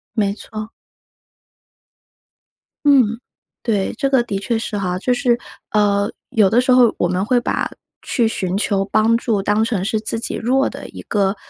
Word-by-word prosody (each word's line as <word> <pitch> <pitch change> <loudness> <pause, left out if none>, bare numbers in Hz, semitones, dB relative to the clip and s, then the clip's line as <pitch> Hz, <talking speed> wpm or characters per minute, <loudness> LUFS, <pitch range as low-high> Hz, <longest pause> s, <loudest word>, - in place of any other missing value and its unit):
没 200 -3 +1
错。 215 +1 -8 2.1
嗯。 245 -6 +4 0.4
对， 205 -5 0
这 275 -2 -1
个 260 -3 +3
的 200 -4 -3
确 225 +3 -1
是 225 -1 -4
哈， 185 -3 -1
就 250 +6 0
是， 245 -2 +2 0.3
呃， 205 0 +2 0.2
有 210 -4 +3
的 235 - +3
时 255 +1 +2
候 250 -2 +6
我 175 - +1
们 185 +2 -1
会 245 +3 +2
把 - - -1 0.3
去 235 -3 0
寻 190 -3 -2
求 200 -2 +1
帮 220 +3 +2
助 230 -3 0
当 210 +2 +2
成 215 -5 -1
是 220 0 0
自 225 +1 -1
己 - - -2
弱 265 +4 +1
的 - - -7
一 - - -10
个， 200 -1 0
220 Hz, 185 characters per minute, -19 LUFS, 200-240 Hz, 2.1 s, 候